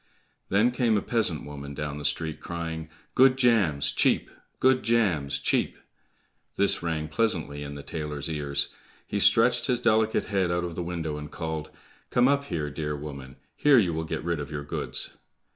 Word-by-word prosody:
Then 105 +6 +4
came 120 -3 +2
a - - 0
peasant 105 -11 0
woman 70 -1 -8
down 75 0 -4
the 75 - -6
street 80 +2 0
crying, 80 -2 -5 0.2
"Good 130 0 +5
jams, 105 - +3
cheap! - - +2 0.3
Good 130 0 +4
jams, 85 -12 +1
cheap!" 70 - 0 0.8
This 100 - +2
rang 80 -2 -2
pleasantly 80 -7 -1
in 70 0 -6
the 70 - -8
tailor's 75 -3 -4
ears; 70 -3 -1 0.3
he 100 - -2
stretched 115 +5 +4
his 125 -3 +1
delicate 110 -2 +2
head 95 -3 0
out 85 0 0
of 85 -1 -4
the 90 - -4
window, 85 -3 -3
and 75 0 -7
called, 80 -2 -4 0.4
"Come 125 +1 +4
up 140 0 +2
here, 75 - -3
dear 75 0 -3
woman; 70 -3 -8 0.2
here 145 -2 +5
you 90 -7 +3
will 80 0 -2
get 80 - -4
rid 85 -2 -1
of 70 - -5
your 75 -1 -4
goods." 75 - -4
80 Hz, 175 wpm, -27 LUFS, 75-110 Hz, 0.8 s, Good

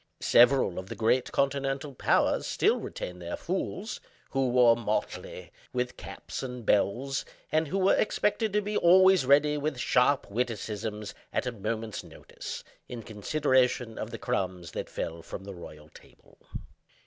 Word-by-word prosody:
Several 120 -6 +4
of 95 +1 -9
the - - -5
great 120 +3 +1
continental 140 0 -1
"powers" - - +2
still - - +2
retain 90 0 -6
their 85 0 -4
"fools," 190 +4 -3 0.3
who 135 -2 +1
wore 120 -1 +6
motley, 110 -2 -4 0.2
with 125 0 -2
caps - - -7
and 125 -3 -6
bells, 130 +8 +1 0.3
and 155 +1 +2
who 190 - -2
were 190 0 +4
expected 215 +1 +1
to 210 - +3
be 210 +1 -3
always 185 -4 +6
ready 150 +2 +4
with 150 -2 -2
sharp 125 +3 +2
witticisms, 105 -2 -3 0.2
at - - -1
a 125 - -1
moment's 110 0 -4
notice, - - -9 0.3
in 120 -2 -6
consideration 125 +1 +1
of 110 - -4
the 115 - -6
crumbs 95 -9 -3
that - - -5
fell 85 0 -4
from 90 +3 -8
the 100 0 -8
royal 75 -4 -11
table. - - -20
125 Hz, 150 wpm, -28 LUFS, 105-140 Hz, 0.3 s, wore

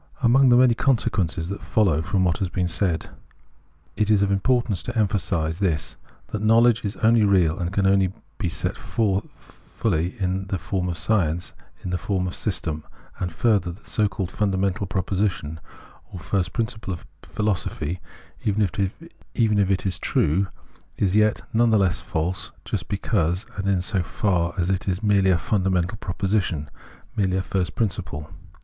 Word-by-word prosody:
«^ - - -14
Among 130 +3 +6
the 120 - +6
many 125 -1 +6
consequences 95 - 0
that 100 - -5
follow 95 -8 +2
from 90 +4 0
what 85 -2 +1
has 95 - -1
been 90 0 -1
said, 85 -1 -1 0.8
it 105 -1 +1
is 105 -2 +4
of 100 - +1
importance 110 -1 +1
to 125 -1 -5
emphasise 90 -6 0
this, 85 -7 0 0.3
that 105 - -3
knowledge 115 +1 +4
is 100 -1 -3
only 115 0 +5
real 95 -4 +3
and 85 -1 -2
can 100 0 +1
only 95 -1 +3 0.3
be 90 - 0
set - - -2
forth 100 -3 0 0.5
fully 90 -4 0
in 95 0 -1
the 95 - -1
form 90 +2 -2
of 85 - -3
science, 85 -2 0 0.3
in 90 - -3
the 90 - -1
form 95 0 -1
of 90 - -3
system; 80 -7 -2 0.4
and 90 -1 -2
further, 100 -2 +2
that 95 - -17
a - - -12
so 105 -2 +3
called 95 -2 -4
fundamental 100 -1 0
proposition 95 -5 -1 0.5
or - - -7
first 90 +2 -1
principle 110 -3 -3
of - - -13 0.2
philosophy, 90 -5 -2 0.4
even 105 0 0
if 95 -1 -2 0.9
it 95 0 0
is 95 - 0
true, 95 +7 +1 0.5
is 100 -1 +1
yet 110 0 +3
none 115 +1 +4
the 110 - +4
less 95 -2 +2
false 90 +3 -2
just - - -3
because 95 -2 0
and 95 0 -3
in 95 -2 +2
so 95 0 +1
far 90 -2 0
as 90 -2 +1
it 95 +1 -1
is 95 +3 -1
merely 100 -2 +4
a 90 - +4
fundamental 95 +3 0
proposition, 95 -6 -1 0.4
merely 95 -2 +1
a 95 - 0
first 90 -4 -2
prin 110 -3 +2
ciple. 75 -4 -7
95 Hz, 175 wpm, -24 LUFS, 90-105 Hz, 0.9 s, Among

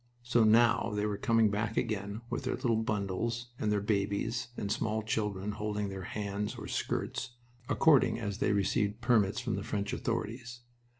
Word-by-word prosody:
So 120 -1 +3
now 110 0 +4
they 105 0 0
were 105 -1 -1
coming 115 -1 +3
back 105 +1 -2
again 105 -2 -2
with - - -3
their 130 - -1
little 115 -4 +1
bundles 110 +3 -2
and 105 - 0
their 105 -1 +1
babies 105 +3 0
and 100 - -2
small 110 0 0
children 105 -2 -1
holding 105 -1 -2
their 95 -1 -6
hands 105 0 -3
or - - -7
skirts, 120 -2 -3 0.3
according 145 -7 +4
as 100 -3 -3
they - - +1
had 105 - +2
received 105 +2 0
permits 115 -3 +3
from 120 -2 -2
the - - -4
French 100 -1 -2
authorities. 120 +2 -3
110 Hz, 175 wpm, -31 LUFS, 100-115 Hz, 0.3 s, now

